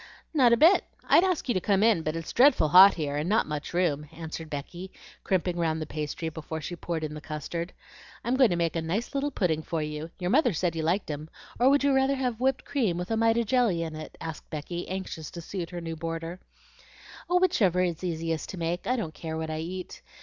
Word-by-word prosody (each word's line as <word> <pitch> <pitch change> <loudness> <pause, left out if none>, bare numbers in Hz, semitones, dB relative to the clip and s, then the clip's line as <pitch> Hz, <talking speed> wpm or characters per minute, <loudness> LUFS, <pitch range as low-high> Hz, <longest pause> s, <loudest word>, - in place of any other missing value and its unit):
"Not 260 -6 +5
a 235 - +5
bit. 335 - +6 0.2
I'd - - +6
ask 365 -6 0
you 245 - +2
to 185 - 0
come 200 +1 +2
in, 225 -7 +4
but 155 0 -2
it's 165 -1 -5
dreadful 250 - +5
hot 190 +5 +9
here, 145 -4 -2
and 155 +4 -1
not 220 +2 +3
much 150 -1 -5
room," 155 -4 0
answered 160 -1 -7
Becky, 175 +6 -6 0.3
crimping 180 -2 0
round 160 -2 0
the 155 - -3
pastry 155 +2 -4
before 160 0 -6
she 175 +3 -5
poured 165 -1 -4
in 150 -1 -3
the 150 - -7
custard. 165 +3 -5 0.5
"I'm 245 +2 +1
going 260 -3 +5
to 175 - 0
make 170 -1 0
a 165 - 0
nice 190 +9 -2
little 280 +1 0
pudding 165 - 0
for 165 +1 -3
you; 150 +1 -5
your 180 0 -2
mother 260 -5 +4
said 170 +1 -1
you 160 - -1
liked 170 +2 0
'em; 150 +2 -6 0.3
or 250 +2 +5
would 280 0 +4
you 280 -1 +3
rather 265 +1 +3
have 250 -4 -2
whipped 265 +1 0
cream 220 -12 0
with 180 +4 -4
a - - +2
mite 225 0 +3
of 235 - +1
jelly 220 -8 +2
in 160 -1 -5
it?" 155 - -9
asked 160 -1 -7
Becky, 170 +3 -5
anxious 185 -4 -5
to 175 - -8
suit 170 0 -5
her 175 -1 -6
new 165 -1 -5
boarder. 165 +2 -5 0.9
"Whichever 345 - +3
is 175 -1 -2
easiest 165 -2 -2
to 190 - -6
make. 170 +1 -2
I 250 - +2
don't 195 -10 -3
care 160 +1 -5
what 160 0 -3
I 155 - -3
eat. 180 +3 -6
175 Hz, 235 wpm, -27 LUFS, 160-225 Hz, 0.9 s, hot